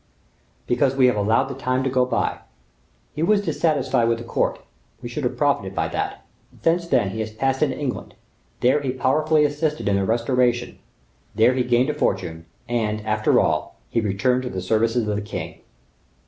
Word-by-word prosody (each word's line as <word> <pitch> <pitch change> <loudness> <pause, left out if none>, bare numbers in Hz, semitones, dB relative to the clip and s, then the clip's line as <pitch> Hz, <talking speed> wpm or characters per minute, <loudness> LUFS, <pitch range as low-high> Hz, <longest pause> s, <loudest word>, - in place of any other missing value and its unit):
"Because 130 +2 +1
we 135 -1 +4
have 125 - +4
allowed 110 +4 +2
the 135 0 -6
time 130 0 -1
to 135 - 0
go 125 -1 +2
by. - - -1 0.7
He 150 - -4
was 205 +5 +3
dissatisfied 130 -10 +1
with 115 - +1
the 115 - -8
court, 115 - -1 0.4
we - - -7
should - - -5
have - - -2
profited - - 0
by - - 0
that; - - -4 0.4
since 170 +1 +2
that, 120 - +2
he 110 - -5
has 110 0 -2
passed 135 +4 -1
into 145 -4 +1
England; 140 -4 -4 0.5
there 135 +4 +3
he 135 - -3
powerfully 150 +4 +2
assisted 150 -1 -1
in 100 -1 +2
the 100 - +1
restoration, 120 +2 0 0.6
there 115 +4 +4
he 130 - 0
gained 125 +3 +2
a - - -5
fortune, 80 - -2 0.2
and, 110 -3 -1
after 110 0 +2
all, - - 0
he 115 - 0
returned 120 +5 +1
to 125 - -4
the 95 - -4
service 110 +5 +1
of 120 -3 +1
the 105 0 -1
king. 105 - -7
125 Hz, 190 wpm, -22 LUFS, 110-135 Hz, 0.7 s, we